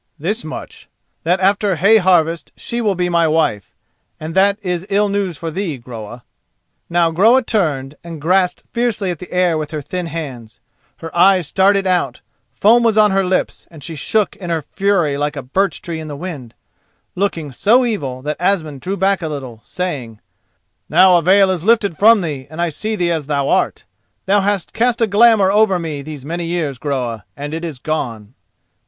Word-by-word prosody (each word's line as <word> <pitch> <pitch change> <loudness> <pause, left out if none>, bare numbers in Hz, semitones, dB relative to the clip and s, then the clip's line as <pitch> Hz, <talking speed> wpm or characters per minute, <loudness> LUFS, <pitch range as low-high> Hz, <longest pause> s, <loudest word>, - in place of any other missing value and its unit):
"This 200 +10 -3
much, 155 - -9 0.3
that 180 +3 +1
after 195 0 +2
hay 200 +8 +5
harvest 170 -4 +2
she 235 0 -4
will 210 -4 +1
be 180 0 0
my 170 -2 +2
wife, 155 - 0 0.4
and 155 +1 -6
that 200 +2 +3
is 180 -2 -2
ill 205 +1 +2
news 195 -5 -2
for 165 +1 -5
thee, 170 -4 -3
Groa." 120 -1 -9 0.7
Now 170 -1 +2
Groa 225 +10 +4
turned 150 - -1
and 165 -2 -8
grasped 180 +4 +1
fiercely 230 -5 -1
at 170 - -6
the 180 - -10
air 180 -3 +1
with 150 -1 -4
her 155 - -4
thin 180 +3 -4
hands. 130 -9 -7 0.4
Her 165 0 -9
eyes 185 0 +4
started 195 +4 +2
out, 175 -9 0 0.3
foam 215 - +4
was 225 -2 +2
on 210 -1 +5
her 195 0 +2
lips, 185 0 -2
and 155 -4 -13
she 165 - -6
shook 200 +7 0
in 180 -3 -7
her 165 -2 -1
fury 175 -4 0
like 150 +1 -1
a 140 - -5
birch 180 +7 -1
tree 170 -2 -5
in 155 - -7
the 145 - -6
wind, 145 -9 -7 0.6
looking 170 -6 -2
so 235 - +3
evil 135 - -3
that 150 0 -3
Asmund 160 -8 0
drew 195 +2 -3
back 195 0 +1
a 160 - -3
little 130 -6 -6
way, - - -28
saying: 140 - -5 0.7
"Now 185 -1 +6
a - - +2
veil 190 +3 +4
is 175 -3 -3
lifted 210 -4 +2
from 220 +4 +5
thee 145 -6 -5
and 160 +2 -10
I 175 0 +1
see 215 +8 -2
thee 175 -3 0
as 155 -4 -2
thou 140 -2 0
art. - - 0 0.4
Thou 200 +1 +3
hast 200 -2 -1
cast 240 +1 +1
a 230 - +4
glamour 210 -2 +4
over 210 -2 +3
me 160 -4 -5
these 145 -2 -9
many 170 +2 -4
years, 160 -7 -2
Groa, 125 -7 -3
and 145 +2 -6
it 165 +1 -4
is 160 -5 -5
gone." 120 -7 -4
175 Hz, 195 wpm, -18 LUFS, 150-195 Hz, 0.7 s, Now